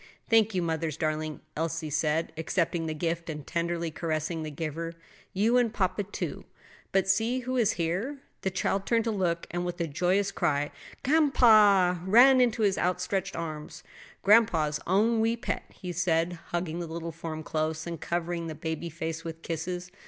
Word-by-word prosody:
"Thank 220 -2 +4
you, 180 - +1
mother's 160 -2 -2
darling," 155 -1 -2
Elsie 165 -1 -2
said, 155 +2 0
accepting 165 0 -1
the 155 - -3
gift 170 +1 -2
and 150 -3 -5
tenderly 170 -1 -2
caressing 160 0 -2
the 155 - -4
giver; 165 +2 -4 0.4
"you 220 +6 +3
and 235 -3 +1
papa, 205 -2 0
too. 205 0 -5 0.5
But 195 -1 +2
see 225 +6 +2
who 255 +1 -3
is 230 -4 +3
here?" 185 - -2 0.2
The 190 - 0
child 190 +1 -1
turned 230 -1 +3
to 225 - -1
look, 175 -5 0
and 175 0 -2
with 175 0 -4
a 170 - +1
joyous 180 +6 +1
cry 145 0 0 0.3
"G'anpa!" 215 - +5
ran 250 +7 +7
into 235 -2 +2
his 195 -2 +2
outstretched 185 +2 -1
arms. 155 -2 -6 0.4
"Grandpa's 175 -9 +4
own 220 +5 +3
wee 225 +1 +2
pet," 235 - -3
he 180 - -7
said, 170 0 0
hugging 175 -1 -2
the 170 - -4
little 165 +1 -5
form 160 -1 -6
close 155 +1 -2
and 170 -2 -6
covering 170 -1 -2
the 160 - -5
baby 160 +2 -4
face 165 0 -4
with 165 0 -7
kisses. 175 +2 -4
170 Hz, 170 wpm, -28 LUFS, 160-200 Hz, 0.5 s, ran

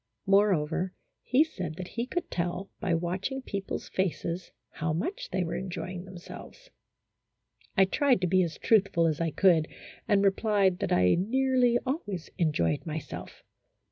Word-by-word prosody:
Moreover, 185 -3 +2 0.3
he 265 +4 +4
said 180 - -6
that 185 +1 -7
he 235 +1 -3
could 350 +5 -3
tell 180 +2 -2
by 185 -5 +1
watching 185 +11 -2
people's 200 -4 -4
faces 180 -1 -2 0.2
how 155 0 -2
much 185 - -3
they 185 0 0
were 165 - -3
enjoying 185 -1 -5
themselves. 190 - -11 1.1
I 190 - +7
tried 255 +5 +2
to 180 - +2
be 185 +2 +4
as 170 -3 -2
truthful 195 -6 +3
as 160 -1 0
I 165 - +1
could, 165 -2 +4 0.4
and 200 -1 +3
replied 195 -2 +2
that - - -2
I 90 0 +4
nearly 250 +3 +3
always 230 - -3
enjoyed 115 - +1
myself. 160 -1 -7
185 Hz, 145 wpm, -29 LUFS, 170-210 Hz, 1.1 s, I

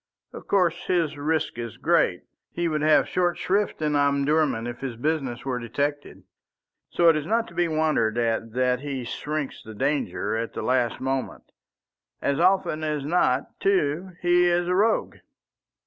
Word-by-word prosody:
Of - - -10
course 180 -4 +1
his 165 -4 +1
risk 155 -3 -1
is 115 -3 -6
great. - - +2 0.3
He 175 0 -1
would 155 -2 -1
have 155 0 +4
short 175 -1 0
shrift 195 -4 0
in 150 -1 +1
Omdurman 140 -3 +2
if 120 0 -6
his 130 -3 -5
business 135 -2 -2
were 130 -2 -2
detected. 145 +5 -3 0.7
So 170 - +2
it 165 - +5
is 155 0 -3
not 230 +2 +1
to - - -15
be 175 0 +1
wondered 155 -8 +1
at 115 -1 -1
that 125 0 +1
he 135 -2 -4
shirks 150 +4 -4
the 110 0 -11
danger 140 0 -1
at 115 +1 -3
the - - -4
last 125 -2 +1
moment. 135 0 -3 0.8
As 140 0 0
often 180 -3 +2
as 150 -2 -2
not, 145 -5 0
too, 185 -1 0
he 175 0 +4
is 175 0 +1
a 180 - +1
rogue. 215 +4 +1
150 Hz, 165 wpm, -25 LUFS, 130-170 Hz, 0.8 s, it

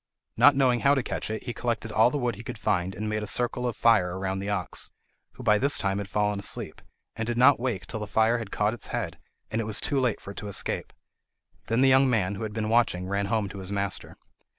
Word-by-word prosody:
Not 140 - +6
knowing 130 -3 +3
how 140 +2 +4
to 135 - 0
catch - - -4
it, 110 -1 -4
he 120 - -4
collected 115 -2 -3
all 110 +3 +5
the 145 - -2
wood 125 -3 -1
he 105 - -9
could - - -6
find 95 -3 -1
and 110 +2 -4
made 105 0 -1
a 105 - -4
circle 125 +2 0
of 120 - -4
fire 90 -6 +3
round 95 0 -2
the 100 - -4
ox, 100 - -2 0.4
who 130 - -11
by 105 -3 +4
this 140 +4 +4
time 100 -1 -1
had 100 -1 -6
fallen 105 0 0
asleep, 100 - -2 0.3
and 110 0 -3
did 120 0 -2
not 130 +2 +6
wake 120 -7 -2
till 110 - -5
the 105 - -5
fire 110 +3 +2
had 110 -4 -6
caught 105 +1 0
its 120 - -6
head, - - -4 0.3
and 110 +1 0
it - - -4
was 110 -1 0
too 140 -2 0
late 125 -5 0
for 100 - -9
it - - -13
to 105 - -6
escape. 100 - -3 0.8
Then 115 +3 +1
the 135 - +5
young 130 0 +5
man, 100 -6 +1
who 100 - -7
had 110 -1 -3
been 110 0 -3
watching, 110 -6 +2
ran 100 +1 -1
home 110 -1 0
to 100 - -8
his 95 +1 -5
master. 100 -1 -1
110 Hz, 260 wpm, -27 LUFS, 100-120 Hz, 0.8 s, Not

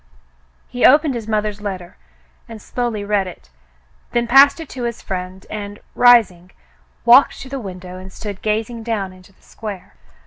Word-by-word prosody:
He 245 - -4
opened 295 +1 +6
his 230 -3 -5
mother's 210 -1 -1
letter 185 -4 -6 0.5
and 225 -1 -9
slowly 235 -1 -3
read 205 -2 0
it, - - -12 0.6
then 240 0 +1
passed 270 +6 +6
it 325 - -7
to 250 -2 -5
his 235 -1 -4
friend 185 0 -6
and, 205 -1 -6 0.2
rising, 215 -8 +4 0.6
walked 245 +4 +6
to 265 - -9
the 275 0 -4
window 185 -3 -8
and 190 +1 -11
stood 205 0 -7
gazing 220 +2 -2
down 215 -5 -3
into 185 +1 -18
the - - -31
square. 210 -4 -8
210 Hz, 165 wpm, -19 LUFS, 190-240 Hz, 0.6 s, opened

